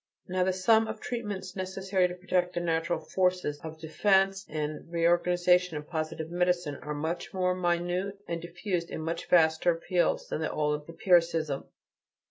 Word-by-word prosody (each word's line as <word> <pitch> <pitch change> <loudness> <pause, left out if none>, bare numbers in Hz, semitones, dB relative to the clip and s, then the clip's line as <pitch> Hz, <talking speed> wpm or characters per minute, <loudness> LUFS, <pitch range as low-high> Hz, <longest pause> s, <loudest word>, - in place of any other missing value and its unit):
Now 185 0 +1
the 190 - +2
sum 220 +4 +3
of 220 0 -5
treatments 205 -7 -5
necessary 190 0 0
to 180 - -7
protect 180 -1 0
the - - +1
natural 170 0 0
forces 180 -5 0
of 160 0 -8
defense 195 +4 +2
and 155 +1 -4
reorganization 175 0 +3
in 150 - -5
positive 160 0 -4
medicine, 175 -4 0
are 150 0 -4
much 160 +5 -4
more 180 -1 +2
minute 180 +2 -1
and 170 0 -3
are - - -5
diffused 175 0 -3
in - - -5
much 165 +1 -3
vaster 165 0 +4
fields 175 -1 0
than 155 - -3
the 160 - 0
old 150 0 -1
empiricism. 165 -5 +2
175 Hz, 160 wpm, -29 LUFS, 160-185 Hz, -, vaster